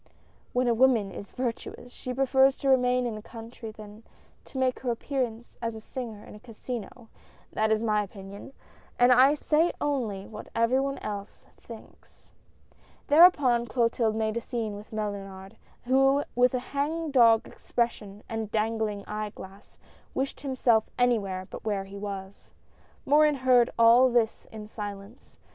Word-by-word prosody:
When 250 0 +1
a 235 - +3
woman 230 -5 +3
is 200 - -9
virtuous, 245 0 -5
she 255 - -7
prefers 265 +1 +3
to 275 - -1
remain 250 -1 +3
in 235 - -2
the 215 - -7
country 225 +1 -10
than 215 0 -12 0.4
to - - -10
make 260 -1 0
her 255 - -3
appearance 240 -1 -3
as 230 -1 -3
a - - -7
singer 225 -2 -7
in - - -12
a 210 - -12
casino 235 0 -8 0.2
— - - -30
that 220 0 +1
is 220 +1 +1
my 210 -2 +2
opinion, 200 +4 -9 0.5
and 245 +1 +5
I 260 +4 +6
say 315 +3 +2
only 230 -9 -2
what 215 - -10
every 230 +3 +2
one 275 0 -2
else 205 0 -7
thinks." 230 -2 -15 0.8
Thereupon 285 -7 +6
Clotilde 230 -1 +1
made 220 0 -1
a - - -2
scene 225 -4 -4
with 205 +1 -11
Mellunard, 195 -3 -6 0.3
who 270 +3 +3
with 250 +1 +3
a - - 0
hang 310 +3 -1
dog 230 -4 +5
expression 210 -4 -3
and 225 -2 -4
dangling 220 -2 -1
eye 210 0 -4
glass, 195 +2 -13 0.4
wished 270 +1 -3
himself 250 -5 +1
any 245 -2 +3
where 190 -2 -5
but - - -10
where 205 -3 -1
he 195 +1 -10
was. 195 -1 -7 0.6
Morin 300 +1 +4
heard 255 -2 +4
all 235 +3 +6
this 235 -2 0
in 215 -1 -8
silence. 205 +1 -9
230 Hz, 160 wpm, -27 LUFS, 210-255 Hz, 0.8 s, I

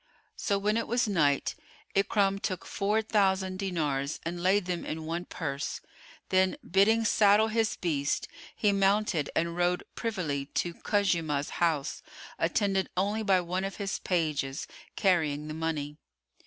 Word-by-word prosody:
So 200 - 0
when 210 +2 +1
it 230 - -1
was 240 0 +1
night, 150 -8 +2 0.4
Ikrimah 195 0 +2
took 185 -4 -3
four 210 +2 0
thousand 190 -3 +1
dinars 150 -7 -1
and 175 +1 -4
laid 190 +2 +3
them 180 -1 -2
in 160 0 -5
one 170 +2 -3
purse; 140 -6 -4 0.5
then, 185 0 +3
bidding 220 +5 +4
saddle 210 0 +5
his 225 0 +1
beast, 150 -5 -1 0.3
he 210 - +2
mounted 195 -5 +2
and 170 0 0
rode 175 0 +1
privily 165 - -2
to 175 - 0
Khuzaymah's 165 -9 0
house, 160 -5 +1 0.4
attended 195 -2 +1
only 205 +4 +1
by 195 -4 +3
one 180 +2 -2
of 195 -1 -3
his 200 -1 -3
pages, 150 -5 -1 0.3
carrying 155 -7 +1
the 155 - -5
money. 155 -2 -3
185 Hz, 140 wpm, -29 LUFS, 160-200 Hz, 0.5 s, saddle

